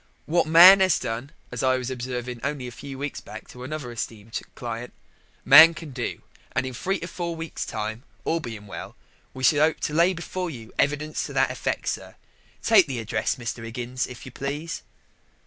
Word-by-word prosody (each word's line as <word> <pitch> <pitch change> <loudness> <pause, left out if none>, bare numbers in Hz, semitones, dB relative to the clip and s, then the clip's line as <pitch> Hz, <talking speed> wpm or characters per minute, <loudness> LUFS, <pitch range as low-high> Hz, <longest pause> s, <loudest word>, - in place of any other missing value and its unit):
What 170 0 +2
man 180 +4 +9
'as 190 -1 +4
done, 115 +4 -4 0.2
as 125 - -4
I 130 0 +3
was 130 0 -4
observing 125 -1 -4
only 140 -2 -2
a 125 - -6
few 135 +2 -8
weeks 140 +1 -4
back - - -10
to 125 - -10
another 145 -2 -5
esteemed 115 -1 -5
client, 120 0 -6 0.5
man 165 +2 +10
can 155 -2 -8
do, 125 -2 -4 0.3
and 130 - 0
in 130 - -5
three 190 +10 -1
to 170 - -4
four 170 -1 -4
weeks' 165 -1 -5
time, 110 +2 -4 0.2
all 165 - +1
being 115 -8 -7
well, 100 - -8 0.4
we 130 - -7
shall 145 +3 +5
'ope 155 +1 +3
to 150 - -2
lay 170 +4 +4
before 180 +2 -4
you 115 -7 -9
evidence 150 +2 0
to - - -9
that - - +2
effect, - - -3
sir. - - -4 0.5
Take 210 -7 +6
the 135 -3 -3
address, 115 -2 -1
Mr. 120 -2 -5
'Iggins, 120 +2 -3
if 125 - -10
you 130 - -9
please." 145 +6 -4
130 Hz, 195 wpm, -25 LUFS, 120-160 Hz, 0.5 s, man